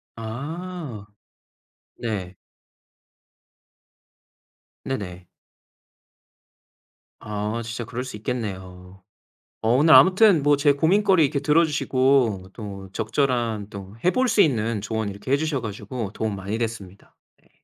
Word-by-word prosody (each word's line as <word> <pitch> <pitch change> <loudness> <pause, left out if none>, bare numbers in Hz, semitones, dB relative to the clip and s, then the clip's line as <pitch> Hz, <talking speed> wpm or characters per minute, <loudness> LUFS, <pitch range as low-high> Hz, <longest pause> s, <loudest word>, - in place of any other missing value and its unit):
아. 140 - -6 0.9
네. 95 -5 -4 2.5
네네. 90 -9 -5 1.9
아 105 +2 -3
진짜 115 +1 -5
그럴 125 +3 -5
수 130 - -7
있겠네요. 95 -5 -6 0.6
어 110 - 0
오늘 155 +4 +5
아무튼 185 -4 +6
뭐 145 -1 +4
제 145 0 +4
고민거리 185 +3 +3
이렇게 140 0 +1
들어주시고 135 - +2
또 100 -3 -8
적절한 115 -2 -1
또 100 0 -9
해 180 - +4
볼 255 0 +1
수 210 - +4
있는 115 - +1
조언 110 -1 -3
이렇게 100 +6 -7
해 140 - +5
주셔 155 -4 -1
가지고 105 0 -5
도움 110 -2 -2
많이 100 +3 -4
됐습니다. 110 -5 -6 0.3
네. - - -30
115 Hz, 220 characters per minute, -24 LUFS, 100-145 Hz, 2.5 s, 아무튼